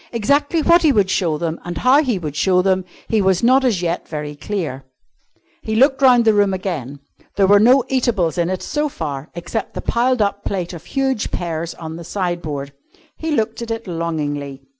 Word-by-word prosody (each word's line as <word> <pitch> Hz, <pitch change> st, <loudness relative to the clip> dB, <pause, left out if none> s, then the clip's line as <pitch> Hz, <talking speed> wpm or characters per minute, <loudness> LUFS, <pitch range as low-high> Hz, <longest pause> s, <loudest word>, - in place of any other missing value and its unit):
Exactly 285 Hz, +8 st, +1 dB
what 340 Hz, +3 st, +5 dB
he 310 Hz, -, +4 dB
would 200 Hz, -6 st, +2 dB
show 165 Hz, -6 st, 0 dB
them 165 Hz, +1 st, -3 dB
and 175 Hz, 0 st, -5 dB
how 265 Hz, +4 st, +4 dB
he 250 Hz, -9 st, 0 dB
would 155 Hz, -5 st, -5 dB
show 180 Hz, +3 st, +2 dB
them, 190 Hz, -1 st, +1 dB, 0.2 s
he 220 Hz, -2 st, +1 dB
was 190 Hz, 0 st, +2 dB
not 260 Hz, +3 st, +5 dB
as 215 Hz, -9 st, +1 dB
yet 170 Hz, 0 st, -2 dB
very 150 Hz, -1 st, -5 dB
clear. 145 Hz, -3 st, -4 dB, 0.8 s
He 220 Hz, -, -3 dB
looked 270 Hz, +4 st, +3 dB
round 250 Hz, -3 st, +5 dB
the 220 Hz, -, +5 dB
room 205 Hz, -2 st, +2 dB
again. 145 Hz, -8 st, -5 dB, 0.3 s
There 195 Hz, -, +3 dB
were 205 Hz, +1 st, +6 dB
no 250 Hz, +5 st, +5 dB
eatables 220 Hz, -10 st, 0 dB
in 170 Hz, 0 st, +1 dB
it 185 Hz, 0 st, -3 dB
so 300 Hz, 0 st, -1 dB
far 145 Hz, -, -5 dB
except 190 Hz, +6 st, -4 dB
the -, -, -3 dB
piled 250 Hz, +1 st, +1 dB
up 200 Hz, -1 st, 0 dB
plate 180 Hz, -3 st, -3 dB
of 170 Hz, -1 st, -10 dB
huge 265 Hz, -4 st, -1 dB
pears 170 Hz, -1 st, -4 dB
on 160 Hz, -1 st, -7 dB
the 170 Hz, -, -8 dB
sideboard. 165 Hz, -7 st, -4 dB, 0.4 s
He 320 Hz, -, -5 dB
looked 225 Hz, -6 st, -1 dB
at 235 Hz, -, -5 dB
it 225 Hz, 0 st, -4 dB
longingly. 145 Hz, -6 st, -4 dB
190 Hz, 200 wpm, -19 LUFS, 165-235 Hz, 0.8 s, were